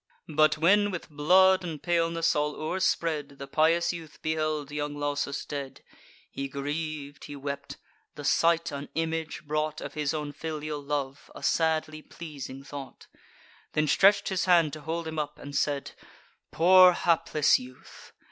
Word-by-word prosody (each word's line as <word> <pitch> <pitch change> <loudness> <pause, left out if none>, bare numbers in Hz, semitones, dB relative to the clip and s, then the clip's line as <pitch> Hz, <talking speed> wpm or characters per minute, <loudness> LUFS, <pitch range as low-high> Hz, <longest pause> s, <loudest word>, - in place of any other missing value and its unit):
But 155 0 +4
when, 205 +6 +4
with 180 -4 -6
blood 185 +6 +5
and 160 -4 -5
paleness 165 -1 +1
all 150 0 0
o'erspread, 155 -4 -1
The 140 - -7
pious 160 +4 +2
prince 165 -3 -9
beheld 155 -2 -2
young 145 0 -3
Lausus 145 -1 -2
dead, 140 -2 -6 0.5
He 140 0 -4
griev'd; 145 +1 -5
he 145 - -8
wept; 140 0 -6 0.4
the 145 - -8
sight 170 +3 +2
an 140 0 -6
image 160 -1 -2
brought 155 +1 -1
Of - - -7
his 150 -2 -1
own 150 -2 -3
filial 155 -1 -5
love, 140 -1 -4
a - - -10
sadly 155 -1 +1
pleasing 140 -5 -9
thought: 140 -1 -9 0.7
Then 155 - +2
stretch'd 195 +7 +4
his 185 -3 0
hand 170 -5 +4
to 155 - -7
hold 165 +2 -3
him 160 0 -4
up, 150 -1 -4
and 145 0 -9
said: 145 -2 -1 0.6
"Poor 185 +2 +7
hapless 160 -3 +3
youth! 125 0 -13
155 Hz, 150 wpm, -28 LUFS, 145-165 Hz, 0.7 s, Poor